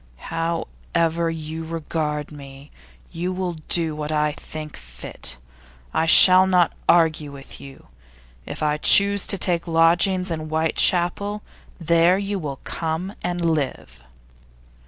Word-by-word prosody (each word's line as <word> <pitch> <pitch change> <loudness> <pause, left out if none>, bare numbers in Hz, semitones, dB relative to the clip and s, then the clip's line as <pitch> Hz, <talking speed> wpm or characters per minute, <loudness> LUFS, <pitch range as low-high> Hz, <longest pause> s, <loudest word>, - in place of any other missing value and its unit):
'However 165 - -3
you 160 0 -6
regard 155 -2 -4
me, 140 -1 -13 0.4
you 175 +2 -4
will 185 -1 -4 0.2
do 165 -3 +2
what 150 0 -5
I 150 0 0
think 155 0 -10
fit. - - -5 0.6
I 160 - 0
shall 185 +3 +7
not 180 -2 +2 0.2
argue 160 -3 +2
with 140 -1 -12
you. 135 -1 -14 0.6
If - - -6
I 150 0 0
choose 200 +4 +5
to 195 - +2
take 175 -2 -1
lodgings 170 +3 +2
in 155 -1 -5
Whitechapel, 175 +5 +1 0.4
there 170 +2 +2
you 200 0 -4
will 140 -5 -7
come 165 +4 -5
and 175 -1 -3
live. 135 - -3
165 Hz, 125 wpm, -21 LUFS, 150-175 Hz, 0.6 s, shall